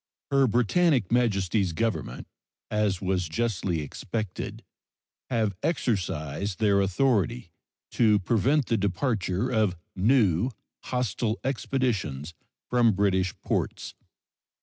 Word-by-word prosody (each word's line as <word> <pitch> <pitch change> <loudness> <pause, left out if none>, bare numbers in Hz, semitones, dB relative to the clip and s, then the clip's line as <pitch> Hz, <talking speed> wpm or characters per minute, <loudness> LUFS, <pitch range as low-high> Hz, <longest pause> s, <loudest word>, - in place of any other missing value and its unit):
Her 135 -1 +4
Britannic 125 - +2
Majesty's 100 -6 +1
Government, 115 +5 -2 0.4
as 105 -3 0
was 90 -3 0
justly 90 -4 -1
expected, 105 +7 -5 0.7
have 110 -5 +1
exercised 95 - -1
their 100 -2 +3
authority 105 0 +1 0.4
to 110 -3 +4
prevent 120 +9 +2
the 115 - +1
departure 100 +2 -1
of 110 -6 +2 0.2
new 105 -1 +3 0.4
hostile 120 -2 -1
expeditions 110 - -2 0.3
from 120 -3 +3
British 95 -2 +1
ports. - - -2
105 Hz, 95 wpm, -27 LUFS, 95-120 Hz, 0.7 s, Her